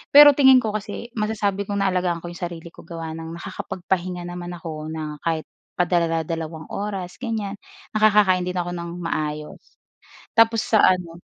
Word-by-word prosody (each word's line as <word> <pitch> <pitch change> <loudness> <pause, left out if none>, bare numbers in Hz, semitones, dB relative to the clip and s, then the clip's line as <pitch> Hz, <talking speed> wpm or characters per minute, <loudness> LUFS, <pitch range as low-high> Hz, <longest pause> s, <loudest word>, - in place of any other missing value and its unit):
Pero 290 0 +12
tingin 265 -2 +8
ko 215 - -1
kasi 215 +3 -5
masasabi 205 -2 -1
kong 200 -1 -1
naalagaan 180 -2 +1
ko 175 - -5
'yong 175 - -10
sarili 170 0 -9
ko - - -13
gawa 165 -1 -5
ng 165 +1 -7
nakakapagpahinga 180 -1 -3
naman 175 0 -6
ako 155 -2 -6
na 155 -2 -5
kahit 160 -1 0 0.4
padala-dalawang 165 -2 0
oras, 195 -3 -4
ganyan, 220 -5 -2 0.4
nakakakain 210 -4 +5
din 180 0 -3
ako 175 0 -2
ng 170 0 -5
maayos. 150 -2 -3 0.8
Tapos 225 -1 +5
sa 220 - +4
ano 175 -2 +2
180 Hz, 155 wpm, -23 LUFS, 165-205 Hz, 0.8 s, Pero